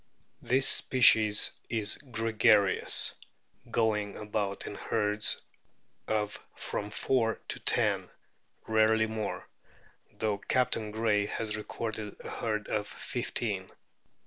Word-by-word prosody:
This 130 +1 +5
species 110 -5 +6 0.2
is 110 -3 0
gregarious, 110 -6 +2 0.6
going 105 -3 0
about 105 -2 -3
in - - -6
herds 105 0 0 0.7
of 105 -1 -2 0.2
from 105 - -4
four 115 +1 0
to - - -3
ten, - - 0 0.6
rarely 110 0 +3
more, 110 -2 -5 0.7
though 105 -2 -2
Captain 115 -2 -1
Gray 105 -1 0
has 110 0 -2
recorded 110 -1 -5
a - - -8
herd 105 -2 -3
of 105 -1 -2
fifteen. - - -3
110 Hz, 100 wpm, -29 LUFS, 105-115 Hz, 0.7 s, species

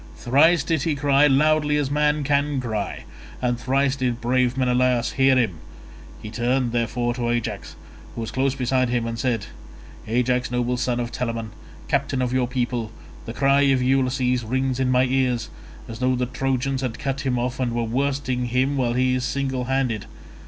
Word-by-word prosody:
Thrice 150 +6 +3
did 160 -2 0
he 155 +1 0
cry 140 0 +3
as 145 - +4
loudly 150 +1 +3
as 145 -2 -1
man 150 0 +1
can 140 0 +1
cry, 110 -5 -4 0.4
and 120 -1 -1
thrice 135 +2 +1
did 125 -3 -1
brave 125 +1 +1
Menelaus 125 -1 +2
hear 135 0 +3
him; 110 -11 0 0.6
he 105 - -7
turned, 120 +1 0
therefore, 120 +1 -1
to 120 -1 -2
Ajax 120 -1 -3 0.4
who 115 - -4
was 115 - -5
close 135 +1 0
beside 130 -1 +1
him 120 -1 0
and 115 0 -4
said, 115 -4 -1 0.6
"Ajax, 125 +2 +1
noble 125 0 0
son 125 0 -1
of 120 0 -3
Telamon, 115 -3 -3 0.4
captain 130 - 0
of 125 -1 -1
your 130 -1 +1
people, 120 -3 -2 0.4
the 115 - -5
cry 140 +2 +3
of 135 -2 +3
Ulysses 125 -1 +1
rings 130 +3 -1
in 130 -1 +1
my 125 0 +4
ears, 125 -3 0 0.4
as 115 0 -8
though 130 0 +2
the 125 0 0
Trojans 135 +1 -1
had 125 -4 -3
cut 135 -2 -3
him 130 -2 -1
off 125 +1 -2
and 125 -2 0
were 120 0 -1
worsting 130 +1 -1
him 130 +4 0
while 120 -3 +1
he 130 +1 +2
is 130 0 -1
single 130 -1 -2
handed. 130 -5 -1
125 Hz, 185 wpm, -23 LUFS, 120-135 Hz, 0.6 s, as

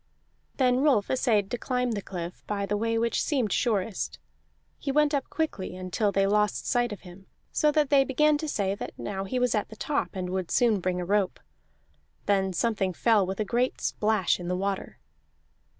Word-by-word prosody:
Then 250 -2 +3
Rolf 265 -8 +3
essayed 220 -6 +1
to 245 - -2
climb 250 0 -1
the 210 -3 -2
cliff 175 -2 -7
by 200 -1 -1
the 205 - -1
way 230 +2 0
which 230 +1 +1
seemed 255 - 0
surest; 195 - -1 0.6
he 275 - -2
went 300 +1 +3
up 280 - -1
quickly 255 - -3
until 185 +3 -1
they 195 0 +2
lost 210 +1 +1
sight 240 -2 +1
of 205 - -7
him, 185 +1 -14 0.2
so 300 - +3
that 295 -2 +1
they 275 -1 +6
began 300 +3 +3
to 310 - -3
say 200 -8 0
that 200 - -7
now 195 -1 -4
he 255 +6 -2
was 250 -2 +2
at 210 -2 -1
the 220 - -10
top, 285 0 -2
and 180 -1 -3
would 185 -2 -2
soon 230 -4 +3
bring 180 0 -1
a 180 - -3
rope. 200 0 +1 0.9
Then 195 -1 +2
something 195 -1 0
fell 210 0 +3
with 190 +2 -4
a 215 - 0
great 245 +4 0
splash 210 -5 +1
in 175 - -6
the 180 0 -1
water. 195 0 -3
210 Hz, 200 wpm, -27 LUFS, 190-250 Hz, 0.9 s, they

